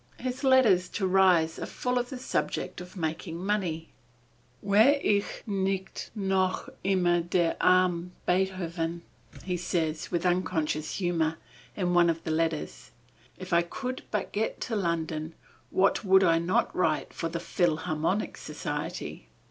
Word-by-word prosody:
His 255 +2 -4
letters 230 -10 +5
to 200 - 0
Ries 185 -4 +4
are - - -4
full 250 0 -1
of 245 0 -3
the 265 - -5
subject 250 -7 -2
of 180 +2 -11
making 165 +1 -3
money. 180 -4 -2 0.8
"Wäre 220 +9 +5
ich 200 -1 0
nicht 195 -2 -2
noch 190 -2 0 0.2
immer 180 -3 +2
der 170 0 +1
arme 180 -1 +3 0.2
Beethoven," 175 -2 -1 0.4
he 180 -1 -2
says 165 -3 -2
with 175 0 -1
unconscious 160 -4 0
humor, 165 -4 0 0.4
in 180 -3 0
one 175 -1 +5
of 165 0 -1
the 160 - -2
letters. 155 - -2 0.5
"If - - -6
I 170 - +6
could 255 +9 -5
but 210 -3 -2
get 220 +2 -2
to 230 - -2
London, 165 -4 -2 0.3
what 195 +3 +2
would 190 -1 +5
I 165 -2 +4
not 170 +2 0
write 160 -4 0
for 165 - -3
the 170 +1 -3
Philharmonic 165 +2 0
Society. - - -5
180 Hz, 140 wpm, -28 LUFS, 165-195 Hz, 0.8 s, I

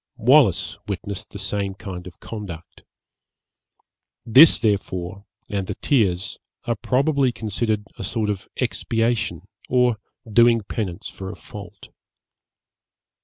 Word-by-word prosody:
Wallis 125 - +4
witnessed 100 -2 -4
the - - -8
same 100 0 -2
kind 95 -3 -7
of 90 - -12
conduct. 95 -7 -8 1.4
This, 135 +8 +8
therefore, 100 -3 -1 0.2
and 100 -3 -2
the - - -3
tears, 100 - +1 0.3
are 120 - +1
probably 135 +3 +2
considered 110 -1 -1 0.2
a - - -4
sort 105 +2 0
of 100 -1 -6
expiation 115 -2 -1 0.3
or 125 -2 +3 0.3
doing 115 +1 +5
penance 100 -3 -4
for 95 0 -7
a - - -9
fault. 105 -1 -11
105 Hz, 115 wpm, -23 LUFS, 95-120 Hz, 1.4 s, This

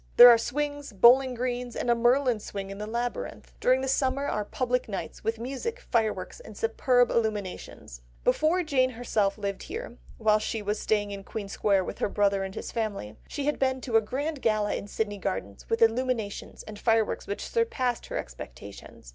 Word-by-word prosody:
There 245 +1 +12
are 235 - +7
swings, 290 +1 -3
bowling 250 +5 +6
greens, 245 0 -3
and - - -3
a 240 - +5
Merlin's 240 -1 +2
swing 195 -1 -6
in 195 - -8
the 210 - -4
labyrinth. 235 +2 -4
During 255 +1 +3
the 265 - -2
summer 270 +1 +1
are 210 -6 -1
public 250 +3 -1
nights, 180 -6 -5
with 225 +1 -1
music, 275 - -4
fireworks, 220 - -1
and 215 -2 -12
superb 245 +2 +2
illuminations." 205 - -3 0.2
Before 335 - +2
Jane 260 -5 +2
herself 225 -5 0
lived 200 -2 -3
here, 450 +9 -7 0.2
while 215 -1 +3
she 215 0 -3
was 205 +1 -1
staying 205 -1 0
in 200 -1 -6
Queen 205 0 -6
Square 195 -1 +1
with - - -6
her - - 0
brother 200 -1 +2
and 190 0 -6
his - - -5
family, 205 - -3
she 285 - -4
had 295 - 0
been 260 -1 +1
to 240 -3 -3
a 225 - +7
grand 285 +6 -3
gala 215 -2 +1
in - - -4
Sydney 205 -1 -3
Gardens, 100 - -4
with 225 0 +3
illuminations, 230 -2 -1
and 210 -1 -9
fireworks 225 -1 +1
which 200 - -4
"surpassed" 260 - -1
her - - -4
expectations. - - -9
225 Hz, 190 wpm, -27 LUFS, 205-255 Hz, 0.2 s, There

